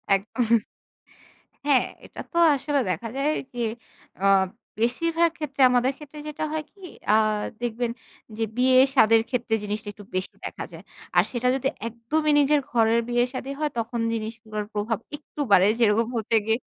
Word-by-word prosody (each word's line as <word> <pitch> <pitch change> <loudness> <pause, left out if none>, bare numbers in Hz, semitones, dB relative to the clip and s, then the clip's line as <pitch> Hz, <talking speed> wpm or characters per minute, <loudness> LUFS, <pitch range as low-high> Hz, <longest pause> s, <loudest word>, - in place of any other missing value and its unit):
একদম। 225 +3 +1 1.1
হ্যাঁ, 270 -4 +4 0.2
এটা - - -12
তো 340 - -4 0.2
আসলে 280 +1 0
দেখা 185 +6 -2
যায় 285 +2 +1 0.2
যে 245 - -6 0.6
আ - - +3 0.6
বেশিরভাগ 330 +8 +2
ক্ষেত্রে, 285 -3 -3
আমাদের 250 +2 +3
ক্ষেত্রে 300 0 -11
যেটা 300 +1 -4
হয় 310 -1 -2
কি 400 - -26 0.3
আ - - +5 0.5
দেখবেন 240 0 -1 0.5
যে 225 - 0
বিয়ে-সাদের 255 -3 +5
ক্ষেত্রে 240 -3 -1
জিনিসটা 210 0 -4
একটু 205 - -13
বেশি 185 - -2
দেখা - - -5
যায়। - - -11 0.3
আর - - +7
সেটা 245 0 -1
যদি 270 0 0 0.2
একদমই 295 +7 -1
নিজের 290 +1 +4
ঘরের 230 0 +3
বিয়ে-সাদী 250 +2 -1
হয় 300 -2 0
তখন 230 +1 -3
জিনিসগুলোর 220 -1 -4
প্রভাব 210 +2 -1 0.2
একটু 295 0 -15
বাড়ে 195 0 +7
যেরকম 225 0 +3
হতে 225 +1 0
গিয়ে 225 +1 +2
240 Hz, 150 wpm, -25 LUFS, 225-280 Hz, 1.1 s, আর